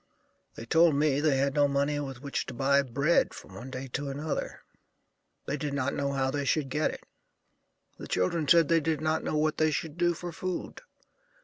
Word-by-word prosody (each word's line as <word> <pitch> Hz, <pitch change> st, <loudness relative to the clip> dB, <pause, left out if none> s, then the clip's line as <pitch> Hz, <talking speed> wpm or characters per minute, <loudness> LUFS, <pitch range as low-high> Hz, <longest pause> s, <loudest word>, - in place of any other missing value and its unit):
They 115 Hz, -, -8 dB
told 160 Hz, +4 st, +4 dB
me 145 Hz, -1 st, +2 dB
they 145 Hz, -2 st, +2 dB
had 140 Hz, 0 st, +1 dB
no 145 Hz, -1 st, +4 dB
money 140 Hz, +1 st, 0 dB
with 135 Hz, -2 st, -6 dB
which 140 Hz, -, -3 dB
to -, -, -7 dB
buy 140 Hz, +2 st, +3 dB
bread 140 Hz, +5 st, +1 dB
from 95 Hz, -, -12 dB
one 115 Hz, +7 st, -8 dB
day 130 Hz, +1 st, -6 dB
to 140 Hz, +3 st, -3 dB
another. 145 Hz, +3 st, -4 dB, 0.8 s
They 145 Hz, -, -2 dB
did 145 Hz, 0 st, -3 dB
not 140 Hz, 0 st, -1 dB
know 140 Hz, 0 st, -1 dB
how 135 Hz, -1 st, 0 dB
they 145 Hz, 0 st, -2 dB
should 140 Hz, +1 st, 0 dB
get 150 Hz, +4 st, +1 dB
it. -, -, -8 dB, 1.0 s
The -, -, -7 dB
children 145 Hz, -, 0 dB
said 165 Hz, 0 st, +6 dB
they 165 Hz, +1 st, +4 dB
did 160 Hz, -1 st, -1 dB
not 155 Hz, +1 st, 0 dB
know 155 Hz, -, -1 dB
what 155 Hz, 0 st, +1 dB
they 155 Hz, 0 st, +3 dB
should 155 Hz, +1 st, -4 dB
do 175 Hz, -1 st, +2 dB
for 175 Hz, +1 st, -6 dB
food. 185 Hz, +2 st, -5 dB
145 Hz, 205 wpm, -29 LUFS, 135-155 Hz, 1.0 s, said